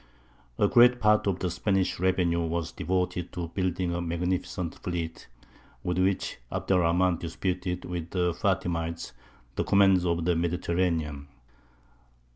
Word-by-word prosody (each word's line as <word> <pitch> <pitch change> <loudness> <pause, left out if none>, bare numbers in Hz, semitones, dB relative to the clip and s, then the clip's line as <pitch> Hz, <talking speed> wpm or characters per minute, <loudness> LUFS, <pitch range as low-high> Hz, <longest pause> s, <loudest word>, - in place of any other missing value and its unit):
A 105 - +4
great 125 +3 +6
part 105 -2 +3
of 95 -3 +1
the 90 -2 -2
Spanish 95 -1 0
revenue 90 -2 +2
was 85 0 -2
devoted 90 0 -2
to 85 -2 -4
building 90 -1 -1
a 85 - -2
magnificent 90 +1 -2
fleet, 85 -2 -4 0.6
with 90 0 -1
which 95 +1 0
Abd - - -3
er - - +5
Rahmān 90 0 +2
disputed 90 +1 -3
with 85 -2 -5
the 90 -2 0
Fātimites 85 - -1 0.5
the - - +1
command 95 -2 +4
of 85 -1 0
the 90 -1 +2
Mediterranean. 85 -4 -1
90 Hz, 135 wpm, -28 LUFS, 85-95 Hz, 0.6 s, great